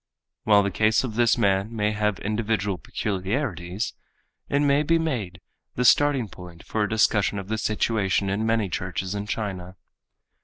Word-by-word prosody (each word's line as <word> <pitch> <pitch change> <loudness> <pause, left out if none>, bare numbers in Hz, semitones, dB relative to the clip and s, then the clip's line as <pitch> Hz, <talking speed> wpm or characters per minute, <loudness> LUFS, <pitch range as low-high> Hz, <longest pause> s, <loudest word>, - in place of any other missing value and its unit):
While 105 -1 +5
the 100 - -1
case 110 +4 +2
of 125 -4 -4
this 120 0 +3
man 100 +3 +1
may 105 -1 +1
have 105 -1 0
individual 105 -3 -1
peculiarities, 95 - -3 0.6
it 140 - +2
may 145 0 +3
be 165 +2 +2
made 120 - -3 0.4
the 125 - 0
starting 140 -2 +4
point 90 -3 -12
for 110 - -2
a 105 - +1
discussion 105 -2 +2
of 95 0 -6
the 110 0 -1
situation 105 -3 0
in 100 +3 -1
many 115 -2 +1
churches 95 +1 -3
in 100 0 -4
China. 95 -4 -4
105 Hz, 160 wpm, -25 LUFS, 95-115 Hz, 0.6 s, While